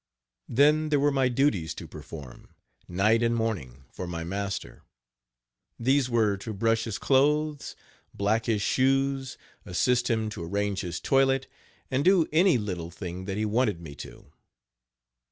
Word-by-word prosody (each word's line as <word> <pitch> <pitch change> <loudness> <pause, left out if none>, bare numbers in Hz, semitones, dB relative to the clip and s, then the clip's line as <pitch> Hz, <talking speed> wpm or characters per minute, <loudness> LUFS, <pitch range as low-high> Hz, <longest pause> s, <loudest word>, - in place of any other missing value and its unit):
Then 150 +5 +4
there 145 -2 +3
were 145 +1 +3
my 135 -2 +2
duties 120 - +1
to - - -8
perform, 75 -4 -11 0.3
night 105 +6 +2
and 120 0 +2
morning, 80 - -3
for 90 - -6
my 85 -1 -4
master; 100 +3 -4 1.0
these 130 +2 +2
were 110 -4 +2
to 110 +2 -6
brush 115 +2 +1
his 110 -3 -3
clothes, 150 +2 +1 0.4
black 110 +3 0
his 105 -3 +1
shoes, 135 +1 +1 0.3
assist 125 +7 +1
him 110 -2 0
to 90 - -6
arrange 100 +2 -1
his 85 -2 -4
toilet, 135 -1 +2 0.5
and 130 +2 +1
do 180 -2 +5
any 170 -2 +5
little 90 -6 -4
thing 90 +1 -7
that 95 0 -3
he 110 - 0
wanted 105 -4 +1
me 80 -4 -9
to. - - -11
115 Hz, 150 wpm, -27 LUFS, 95-135 Hz, 1.0 s, do